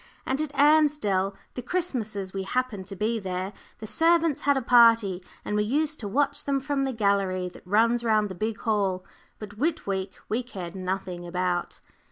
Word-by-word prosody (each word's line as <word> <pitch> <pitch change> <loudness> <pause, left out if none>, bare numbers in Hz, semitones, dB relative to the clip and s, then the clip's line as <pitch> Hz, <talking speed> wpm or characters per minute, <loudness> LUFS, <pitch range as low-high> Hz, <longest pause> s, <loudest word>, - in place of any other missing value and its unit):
And 265 +3 0
at 310 -2 -3
Ansdell, 285 -10 +3 0.2
the 250 - -5
Christmases 225 - -3
we 195 - -2
happened 210 -2 -2
to 195 - -7
be 220 +3 0
there, 190 0 -4 0.2
the 220 - -8
servants 325 +6 +2
had 285 0 +3
a - - 0
party, 230 -6 +5 0.2
and 210 - -2
we 210 - +2
used 300 +7 0
to 210 - -4
watch 280 +8 0
them 275 -1 0
from 275 0 -1
the 265 - -1
gallery 200 -5 0
that 180 - -16
runs 230 +4 +3
round 215 -2 +2
the 190 - -7
big 215 +4 -3
hall. 195 -5 0 0.3
But 210 0 -10
Whit 320 +3 0
week 190 -1 -3
we 230 +3 0
cared 185 -8 -7
nothing 185 -2 -4
about. 180 0 -2
215 Hz, 185 wpm, -26 LUFS, 190-265 Hz, 0.3 s, party